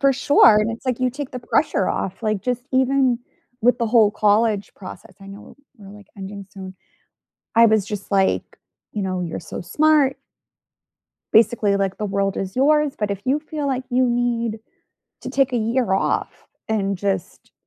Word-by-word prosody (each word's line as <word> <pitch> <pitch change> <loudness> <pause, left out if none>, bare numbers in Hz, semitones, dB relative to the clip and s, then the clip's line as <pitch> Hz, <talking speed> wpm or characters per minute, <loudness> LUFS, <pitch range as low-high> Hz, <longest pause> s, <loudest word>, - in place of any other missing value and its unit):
For 275 -1 +4
sure, 255 -4 +5
and 215 +2 0
it's 230 +3 -8
like, 255 -1 -1
you 255 0 +1
take 275 +2 -6
the 255 - -6
pressure 240 -4 0
off, 190 +4 -4
like, 215 -3 -1
just 245 -1 -2
even 260 -1 +2 0.4
with 245 +1 +3
the 235 - 0
whole 220 -2 +4
college 210 0 +1
process, 190 -1 -11
I 195 - -12
know, 195 +1 -12 0.2
we're, 200 -4 -14
like, 205 0 -14
ending 195 0 -8
soon. 190 -1 -10 0.8
I 230 0 +7
was 220 -2 +2
just 205 -1 -6
like, 195 -1 0 0.3
you 210 - -3
know, 185 -1 -2
"You're 170 -2 -4
so 160 - -8
smart" 290 - +2 1.2
"Basically, 215 -2 +3
like 195 -1 -1
the 210 - -2
world 195 -1 -1
is 190 +2 -5
yours, 300 +1 +3
but 210 -1 -1
if 200 -1 -3
you 270 +3 +1
feel 300 -1 -5
like 260 -2 -2
you 255 +1 +2
need 235 -2 -1 0.6
to - - -6
take 270 -2 +1
a - - +1
year 230 -1 0
off, 195 - -1 0.2
and 200 -3 -1
just, 190 -1 -4
220 Hz, 180 wpm, -21 LUFS, 200-255 Hz, 1.2 s, I